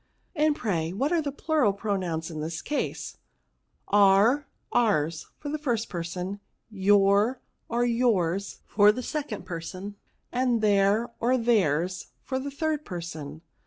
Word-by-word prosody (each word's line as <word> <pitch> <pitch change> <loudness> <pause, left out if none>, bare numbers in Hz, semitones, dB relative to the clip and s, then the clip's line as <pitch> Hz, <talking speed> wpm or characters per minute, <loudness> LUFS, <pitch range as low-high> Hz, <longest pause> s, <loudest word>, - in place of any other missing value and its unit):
" - - -43
And, 305 -1 +3
pray, 170 - -1
what 270 - 0
are 340 -2 +3
the 285 -2 -3
plural 290 -7 +1
pronoxins 180 -6 -2
in 155 -1 -5
this 160 +1 -4
case? 295 - -3 0.2
" - - -48
" - - -45 0.2
Our, 225 +9 +4 0.2
ours, 165 -9 +1
for 290 - -6
the 305 +1 -3
first 240 -7 -1
person; 180 +3 -4 0.3
your, 205 +4 +3 0.3
or 240 +1 +1
yours, 200 -6 0
for 205 0 +5
the 255 +4 -5
second 280 -11 -4
person; 185 +3 -6 0.3
and 250 -2 +1
their, 205 +3 +3
or 250 +2 +2
theirs, 185 - +1 0.2
for 260 -1 -2
the 280 +2 -4
third 305 +1 -2
person." 165 - -7
205 Hz, 150 wpm, -27 LUFS, 180-255 Hz, 0.3 s, for